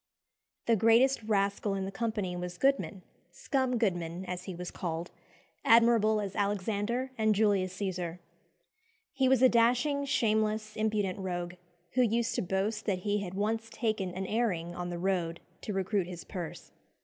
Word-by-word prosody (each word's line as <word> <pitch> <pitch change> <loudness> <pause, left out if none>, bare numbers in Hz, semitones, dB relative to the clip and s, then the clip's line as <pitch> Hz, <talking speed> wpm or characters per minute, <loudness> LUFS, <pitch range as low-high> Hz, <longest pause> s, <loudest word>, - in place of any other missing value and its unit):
The 230 - +4
greatest 230 +5 +4
rascal 200 -1 0
in 190 -1 -2
the 195 - -4
company 210 -5 -2
was 180 0 -5
Goodman 270 -8 +1 0.3
"Scum 260 -3 0
Goodman," 175 -4 -1
as 180 0 -5
he 190 - -5
was 180 +1 -6
called 170 -1 -4 0.5
admirable 230 -2 +5
as 200 -2 -4
Alexander 205 +5 -1
and 220 -1 +3
Julius 195 -3 +2
Cæsar. 180 -4 -3 1.0
He 265 -2 +2
was 260 -1 +4
a - - +10
dashing, 250 +5 +3
shameless, 215 -5 +1
impudent 210 -3 0
rogue, 175 -2 -3 0.4
who 255 - +2
used 235 +1 +1
to - - 0
boast 200 +4 -1
that 190 -3 0
he 205 0 +1
had 190 -2 -5
once 225 +3 -1
taken 215 -6 -1
"an 190 +1 -3
airing" 185 -6 -1
on 175 0 -4
the 175 - -4
road 175 -2 -1 0.2
to - - -4
recruit 195 -1 0
his 175 -2 -7
purse. 175 -5 -7
205 Hz, 160 wpm, -30 LUFS, 185-225 Hz, 1.0 s, a